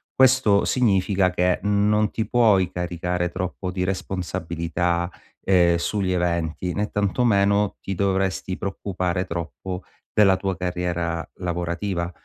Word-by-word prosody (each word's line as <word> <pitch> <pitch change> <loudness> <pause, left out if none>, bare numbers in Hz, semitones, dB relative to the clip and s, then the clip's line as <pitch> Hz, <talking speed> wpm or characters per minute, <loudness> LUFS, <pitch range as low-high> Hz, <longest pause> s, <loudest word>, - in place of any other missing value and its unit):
Questo 130 -6 +5
significa 100 -5 +2
che 90 0 +1
non 105 +1 +2
ti 110 - -2
puoi 105 -7 +3
caricare 90 0 -2
troppo 90 +1 -4
di 90 0 -2
responsabilità, 90 -2 -2 0.3
ehm, 90 -3 +4
sugli 95 +2 -1
eventi, 85 0 -1
né 105 +3 -1
tantomeno 100 -1 +2
ti 95 - -4
dovresti 95 -1 0
preoccupare 95 -2 -2
troppo 90 +1 -5 0.3
della 100 -3 +5
tua 95 0 -2
carriera 90 -2 -2
lavorativa. 85 0 -2
90 Hz, 115 wpm, -23 LUFS, 90-100 Hz, 0.3 s, Questo